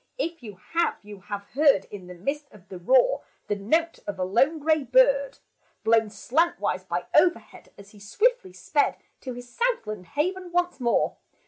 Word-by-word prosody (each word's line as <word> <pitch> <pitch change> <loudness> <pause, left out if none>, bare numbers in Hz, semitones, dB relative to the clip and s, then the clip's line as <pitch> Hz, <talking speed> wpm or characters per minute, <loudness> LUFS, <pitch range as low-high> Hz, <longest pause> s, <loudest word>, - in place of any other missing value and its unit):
If 335 - -3
you 210 -4 -9 0.2
have, 340 +1 +1
you 205 -1 -11
have 200 +1 -6
heard 275 -8 +4
In 190 -3 -9
the 180 - -9
midst 280 - -4
of 200 -2 -18
the 185 - -8
roar, 260 - +3 0.2
The 205 - -1
note 320 +12 0
of 205 -1 -4
a 185 - -1
lone 250 - +2
gray 310 0 +1
bird, - - +3 0.5
Blown 225 -1 +3
slantwise 210 - 0
by 175 -1 -3
overhead 345 +3 +1
As 200 0 -14
he 210 - -16
swiftly 410 - 0
sped 285 +11 0 0.2
To 255 - -6
his 245 0 -9
south 480 - -1
land 210 -4 -7
haven 360 +4 -2
once 355 -2 0
more 235 -2 +1
250 Hz, 180 wpm, -25 LUFS, 200-335 Hz, 0.5 s, heard